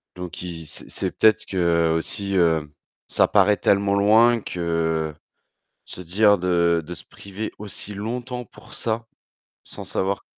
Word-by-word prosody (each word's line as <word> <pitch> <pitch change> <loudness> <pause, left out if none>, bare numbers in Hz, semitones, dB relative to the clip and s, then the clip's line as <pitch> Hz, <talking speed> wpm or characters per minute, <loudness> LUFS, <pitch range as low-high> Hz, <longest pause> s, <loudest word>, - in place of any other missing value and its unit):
donc, 90 -2 -7
i 85 -3 -7
c'est - - -7
c'est - - -2
peut-être 110 -1 +3
qu'aussi, 85 +2 0
heu, 80 -4 +2 0.4
ça - - +3
paraît 105 -1 +4
tellement 100 0 +2
loin 110 +4 +5
que 80 -3 -1 0.7
se 90 - -10
dire 100 +4 +4
de 85 -2 +2
de 90 - -6
se 85 - -9
priver 100 +2 -7
aussi 105 0 -5
longtemps 125 +4 -4
pour - - -14
ça 115 0 -2 0.6
sans - - -4
savoir 95 +1 -2
95 Hz, 140 wpm, -23 LUFS, 85-105 Hz, 0.7 s, loin